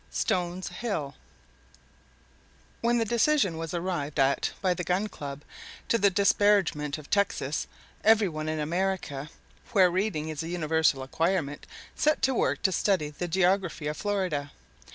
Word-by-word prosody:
STONES 180 +1 -1
HILL 180 -8 -3 1.7
When 235 +1 +2
the 230 - +1
decision 235 - +2
was 165 -1 -5
arrived 170 -5 -2
at 135 +1 +2
by 185 -2 +2
the 180 - -4
Gun 185 +4 0
Club, 145 -4 -7 0.5
to 230 - +3
the 200 - +5
disparagement 190 -6 +2
of 150 -2 -11
Texas, 200 -1 0 0.4
every 220 -1 +5
one 155 -2 -4
in 155 0 -2
America, 160 -3 -2 0.4
where 185 -4 +5
reading 180 -5 -1
is 155 0 -4
a 165 - -5
universal 160 -5 +1
acquirement, 160 +1 -1 0.3
set 305 -2 +1
to 265 0 +3
work - - 0
to 190 - +3
study 185 -6 +1
the 175 +4 -4
geography 180 -2 +1
of 150 +1 -2
Florida. 185 -8 -1
175 Hz, 145 wpm, -28 LUFS, 150-200 Hz, 1.7 s, the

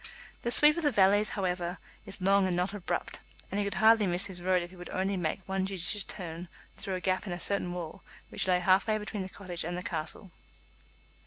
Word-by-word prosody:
The 235 - -1
sweep 295 +7 +5
of - - 0
the 295 - +4
valleys, 205 -2 +4
however, 180 -2 -2 0.3
is 195 +1 -8
long 195 +1 +3
and 180 - 0
not 180 +3 -1
abrupt, 200 -3 -3 0.3
and 200 - -1
he - - +2
could 200 -1 -3
hardly 220 0 +5
miss 175 +2 +1
his 185 -3 -5
road 180 0 +2
if 175 - -9
he - - -13
would 180 0 -10
only 195 +1 -1
make 175 +1 -3
one 190 0 -1
judicious 195 +1 +1
turn 175 -2 -6 0.3
through 190 - -3
a - - -3
gap 185 +2 -1
in 180 - -3
a 175 - -5
certain 200 -3 +4
wall 175 +1 -6 0.3
which - - -1
lay 180 -1 +4
half 190 +4 +4
way 215 -1 +2
between 210 -1 -5
the 190 - -5
cottage 180 -3 -5
and 175 +2 -3
the 180 - -5
castle. 175 0 -2
190 Hz, 230 wpm, -30 LUFS, 180-200 Hz, 0.3 s, sweep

